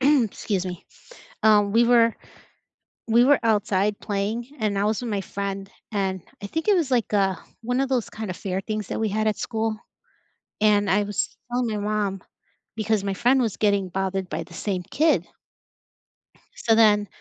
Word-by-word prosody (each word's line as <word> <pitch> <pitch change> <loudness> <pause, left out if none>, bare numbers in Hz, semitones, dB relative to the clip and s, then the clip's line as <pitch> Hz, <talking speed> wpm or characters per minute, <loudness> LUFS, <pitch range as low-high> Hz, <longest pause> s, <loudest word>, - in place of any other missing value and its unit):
excuse 230 -8 +1
me, 180 -2 -6 0.6
um, 210 -2 +5
we 230 +2 +5
were 230 -1 +4 0.9
we 235 +2 +6
were 285 +1 +5
outside 210 -2 +1
playing 210 +4 -2
and 205 -2 0
I 200 - +1
was 215 +2 0
with 240 - -4
my 200 -2 -1
friend, 195 0 -5 0.2
and 190 -3 -1 0.2
I - - -3
think 320 - -3
it 415 - +5
was 315 -7 0
like, 235 -3 +1
uh, 195 -2 +2 0.3
one 245 +3 -1
of 270 - 0
those 250 -4 0
kinda 215 -4 -5
fair 185 +1 -3
things 215 0 -4
that - - -3
we 220 - +1
had 215 +2 0
at 215 - 0
school, 220 -1 -2 0.8
and 205 -2 +4
I 205 +2 +3
was 205 -1 -2 0.2
telling 245 -1 0
my 215 - -2
mom 200 -3 -1 0.6
because 220 -1 0
my 195 - -1
friend 250 +7 +3
was 220 -4 -1
getting 200 -3 +1
bothered 190 0 -2
by - - -3
the 175 - -17
same 185 -2 -2
kid. 315 - +2 1.3
So 225 - +2
then 210 -2 +5
210 Hz, 180 wpm, -24 LUFS, 195-230 Hz, 1.3 s, we